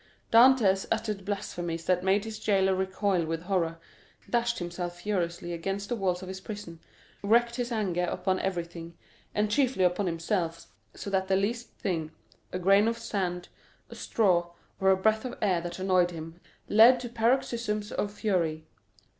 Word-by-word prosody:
Dantès 230 -5 +6
uttered 210 -4 -2
blasphemies 175 -4 -4
that 180 -1 +1
made 195 +2 +2
his 220 -1 -6
jailer 195 -2 +2
recoil 190 -1 0
with 165 +1 -3
horror, 175 -3 0 0.5
dashed 235 0 0
himself 175 0 -5
furiously 175 -4 -2
against 195 +4 -3
the 240 - 0
walls 190 -3 -1
of - - -7
his 190 0 -7
prison, 205 -6 -8 0.4
wreaked 235 +3 +3
his 245 0 -2
anger 185 -6 0
upon 185 +1 -1
everything, 170 -2 -4 0.4
and 210 0 +1
chiefly 255 -6 +2
upon 180 +2 +2
himself, 170 0 -2 0.3
so 200 - -6
that 190 -1 +1
the 190 - +2
least 230 +5 -1
thing,—a 165 0 -5
grain 195 +4 +4
of 230 0 0
sand, 180 -6 -3 0.4
a - - -8
straw, 175 -6 +1 0.3
or 190 - +3
a 190 - +5
breath 220 +3 +2
of 250 -1 -6
air 185 -5 +1
that 175 0 -6
annoyed 185 -2 +2
him, 165 0 -9 0.3
led 230 +4 +7
to 240 - -5
paroxysms 230 -3 0
of 205 - -2
fury. 170 -7 -1
190 Hz, 160 wpm, -28 LUFS, 175-215 Hz, 0.5 s, led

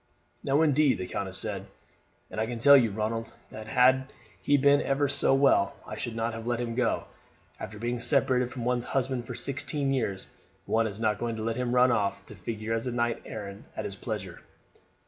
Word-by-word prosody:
"No, 140 +3 +3
indeed," 150 -2 +3
the 95 - -4
countess 95 0 -2
said; - - -2 0.6
"and 110 - -3
I 110 - 0
can 120 0 -4
tell 140 +5 +8
you, 120 -5 +5
Ronald, 110 +2 -3 0.2
that 110 0 -8
had 130 +3 +3 0.3
he 145 - +3
been 140 +1 +4
ever 140 +1 +1
so 140 -1 +3
well 135 -8 +3
I - - -6
should 120 -2 -5
not 115 0 -1
have 115 +1 -7
let 120 -1 0
him 120 -1 -3
go. 125 0 0 0.6
After 105 - -7
being 120 +2 -2
separated 125 -2 +2
from 120 -3 -5
one's 125 -1 0
husband 130 -2 -1
for 125 - -5
sixteen 140 +1 -1
years 100 -7 -2 0.4
one 115 0 +1
is 100 0 -7
not 110 -2 0
going 115 -1 -2
to 110 - -5
let 115 0 -1
him 125 0 -1
run 125 0 +5
off 105 -4 -1
to - - -11
figure 110 +4 -4
as 115 +2 -2
a - - -1
knight 120 -1 -1
errant 100 -2 -7
at - - -3
his - - -4
pleasure." - - -6
120 Hz, 205 wpm, -28 LUFS, 110-130 Hz, 0.6 s, tell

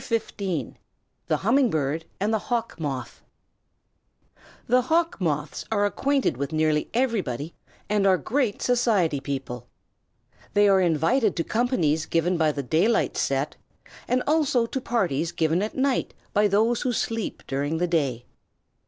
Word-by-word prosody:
THE 195 - -3 0.7
HUMMING 250 +4 +4
BIRD 155 0 -1
AND 210 +3 0
THE 220 - +2
HAWK 230 -6 -2
MOTH 135 -5 -4 1.4
The 250 +2 +3
Hawk 330 +6 +1
Moths 150 -3 -2
are 205 -2 +2
acquainted 270 - 0
with 140 +3 -3
nearly 155 -1 +1
everybody 190 - -1 0.3
and 205 -1 +2
are 190 -1 +5
great 230 - -1
society 215 - +2
people. 135 -4 -5 0.9
They 205 0 +5
are 195 -1 +5
invited 180 - +2
to 165 - 0
companies 175 - 0
given 170 +2 +1
by 160 -2 +2
the 140 -1 -4
daylight 170 - +2
set, 135 +2 -1 0.5
and 250 0 +1
also 290 -6 +2
to 260 +3 -4
parties 170 - 0
given 165 +1 +1
at 215 +5 -4
night 265 0 0 0.2
by 210 +1 +4
those 220 +4 +2
who 250 - 0
sleep 225 -1 -3
during 145 +4 -2
the 175 - +1
day. 140 -9 -1
190 Hz, 140 wpm, -25 LUFS, 155-235 Hz, 1.4 s, are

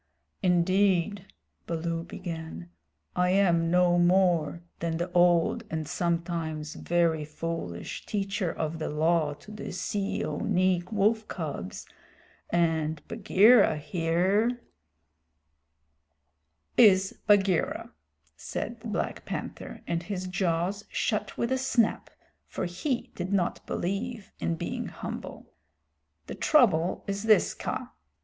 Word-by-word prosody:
"Indeed," 185 +1 +2 0.4
Baloo 165 0 -2
began, 160 - -7 0.4
"I 180 0 +2
am 175 -3 +3
no 175 0 +4
more 175 -2 +3 0.2
than 165 -1 -1
the 175 +2 -3
old 175 +5 +3
and 160 -2 -3
sometimes 165 -2 -2
very 165 -2 +1
foolish 155 - -5
Teacher 195 -3 -1
of 160 +1 -3
the 155 - -2
Law 155 -1 +1
to 210 - -14
the 210 - -6
Seeonee 185 -1 0
wolf 215 +1 +2
cubs, 145 - -5 0.6
and 160 -2 0
Bagheera 215 -3 +5
here 180 +10 +1 1.4
" 75 - +1
"Is 190 +1 -3
Bagheera," 195 -4 +2 0.4
said - - -5
the - - -8
Black - - -3
Panther, - - -6
and 170 0 -1
his 185 0 -4
jaws 185 +2 -1
shut 215 -2 -1
with 235 - -1
a 260 - +1
snap, 240 -4 +1 0.4
for - - -3
he 235 - -3
did 180 +1 -4
not 190 -3 0
believe 200 +3 -3
in 85 0 -1
being - - -4
humble. - - -7 0.7
"The - - -6
trouble 185 - +3
is 200 0 -3
this, 215 -3 +4
Kaa. - - -4
175 Hz, 115 wpm, -28 LUFS, 160-200 Hz, 1.4 s, Bagheera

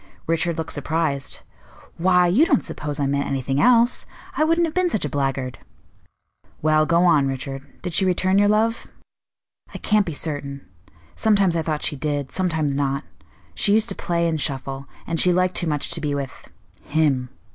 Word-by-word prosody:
Richard 165 +1 0
looked 160 - -3
surprised. 145 -1 -2 0.6
"Why, 180 +1 +4
you 190 - +4
don't 280 -6 +2
suppose 150 0 -5
I 140 - +1
meant 140 +1 0
anything 135 +1 -1
else! 240 +2 +4 0.3
I - - +2
wouldn't 330 +2 +3
have 320 - -4
been 365 -1 +2
such 215 - -1
a - - -2
blackguard." 135 -2 -2 1.0
"Well, 155 0 +3
go 170 +1 +3
on, 150 -6 +4
Richard. 135 +1 -6
Did 180 -2 -4
she 190 - +3
return 185 +1 +2
your 205 - +4
love?" 220 +2 +1 0.9
"I - - -2
can't 210 -2 +1
be 165 - -3
certain. 140 -3 -3 0.5
Sometimes 200 -5 +2
I 165 - +1
thought 155 -2 -3
she 145 - -1
did, 145 -1 -2
sometimes 160 -6 0
not; 140 +1 -1 0.5
she 200 - +2
used 220 0 +2
to - - 0
play 170 -1 -1
and 160 -2 -1
shuffle, 135 -1 -4 0.2
and 165 -1 -2
she 180 - +5
liked 185 +1 +2
too 175 - 0
much 150 0 -1
to 170 -1 0
be 145 -1 -1
with 140 -2 -6 0.3
him. 145 -5 0
160 Hz, 180 wpm, -22 LUFS, 140-185 Hz, 1.0 s, she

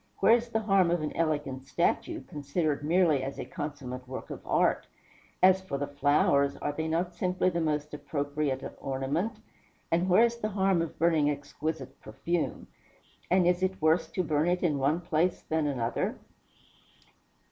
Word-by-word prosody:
Where - - +6
is 235 0 -2
the 225 -1 0
harm 195 -4 +3
of 170 -2 0
an 150 - -4
elegant 145 -5 -1
statue, - - 0
considered 145 +1 -2
merely 160 -3 +3
as 135 +1 -5
a - - -5
consummate 130 -4 -6
work 130 - -7
of - - -7
art? - - +2 0.6
As 190 0 +6
for 185 -7 -4
the 145 - -2
flowers, 145 0 +2
are 145 - -2
they 160 +2 -3
not 170 +3 -1
simply 185 +1 0
the 170 -1 -1
most 150 -1 -1
appropriate 145 -2 -2 0.2
ornament? 140 - -2 0.5
And 175 +3 +2
where 190 +6 +6
is 235 0 -2
the 215 -2 -2
harm 190 -3 +2
of 165 - -4
burning 160 -3 +3
exquisite 145 -1 -5
perfume? 170 +10 -3 0.6
And 180 0 +4
is 180 +1 +2
it 190 0 0
worse 160 +2 +2
to 185 - 0
burn 155 0 +1
it 180 +1 0
in 150 -5 +1
one 145 +6 +1
place 170 +1 0
than 160 -1 0
another?" 120 -5 -1
155 Hz, 170 wpm, -29 LUFS, 145-180 Hz, 0.6 s, Where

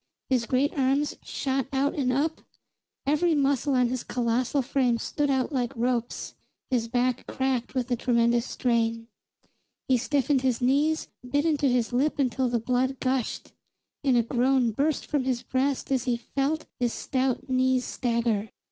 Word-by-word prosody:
His 240 -3 +2
great 270 +3 +1
arms 275 +1 +1
shot 265 -1 -2
out 275 +1 +1
and 260 -4 0
up, 300 +5 0 0.6
every 310 +3 +2
muscle 280 -1 +1
on 250 -1 +3
his 255 0 -3
colossal 250 +3 0
frame 250 -2 +1
stood 290 +5 -1
out 265 +1 +1
like 245 -4 -1
ropes, 240 0 -2 0.4
his 235 -3 +1
back 250 +1 0
cracked 260 -2 -1
with 250 -2 0
the 250 - +1
tremendous 235 0 +2
strain. 230 -1 0 0.8
He 260 - +4
stiffened 275 +1 +1
his 255 -3 +1
knees, 285 +5 +1 0.2
bit 285 +3 +1
into 295 -3 +2
his 245 -2 +1
lip 280 +5 +1
until 260 -2 +1
the 240 - +1
blood 255 +3 0
gushed; 260 -2 -2 0.5
and 265 -3 +3
a 235 - +4
groan 250 0 +2
burst 285 +7 0
from 290 -3 0
his 250 -2 -1
breast 265 +3 -1
as 260 -2 +1
he 245 -2 +1
felt 275 +5 -2
his 240 -2 0
stout 260 -1 -1
knees 255 -1 +2
stagger. 230 -4 -1
255 Hz, 160 wpm, -27 LUFS, 240-275 Hz, 0.8 s, He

